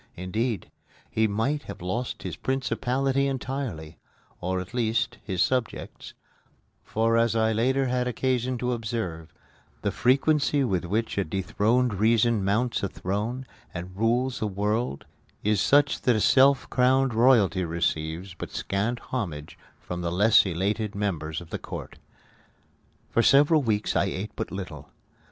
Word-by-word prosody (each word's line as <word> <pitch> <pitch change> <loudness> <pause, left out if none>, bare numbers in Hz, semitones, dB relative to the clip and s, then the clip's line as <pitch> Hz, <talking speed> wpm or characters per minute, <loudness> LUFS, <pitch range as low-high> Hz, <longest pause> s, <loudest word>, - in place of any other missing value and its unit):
Indeed, 105 +4 -2 0.4
he 110 0 +2
might 120 +9 0
have - - -8
lost 95 +8 -3
his - - -4
principality 135 +1 0
entirely 130 - -4 0.4
or, 90 +1 -1
at 90 +5 -8
least, 115 -2 0
his 95 -3 0
subjects; 125 -3 -3 0.7
for, 115 +1 +1
as 115 0 +2
I 110 0 +2
later 130 +5 +1
had 125 0 0
occasion 125 +1 0
to 125 +1 -1
observe, 100 -9 -4 0.5
the - - +1
frequency 140 +2 +2
with 95 -8 0
which 105 +3 -1
a - - +2
dethroned 105 +7 +1
reason 110 +1 +3
mounts 110 +5 +1
a 100 - 0
throne 105 +9 -3 0.3
and 90 +2 -6
rules 120 +5 0
a 110 - +1
world 105 - -1 0.4
is 105 -1 +2
such 145 0 +3
that 120 -4 +3
self 135 +2 +5
crowned 130 0 +3
royalty 110 -6 +4
receives 85 +1 -2
but - - -7
scant 105 +5 -2 0.2
homage 85 - -4 0.2
from 90 0 -6
the 85 -1 -2
less 105 +3 +5
elated 100 +4 -1
members 85 -6 -2
of 85 - -13
the - - -3
court. - - -8 1.1
For 115 - +3
several 145 +5 +5
weeks 110 -5 0
I - - +3
ate 95 +2 -4
but - - -4
little. 80 -7 -7
110 Hz, 140 wpm, -26 LUFS, 95-125 Hz, 1.1 s, self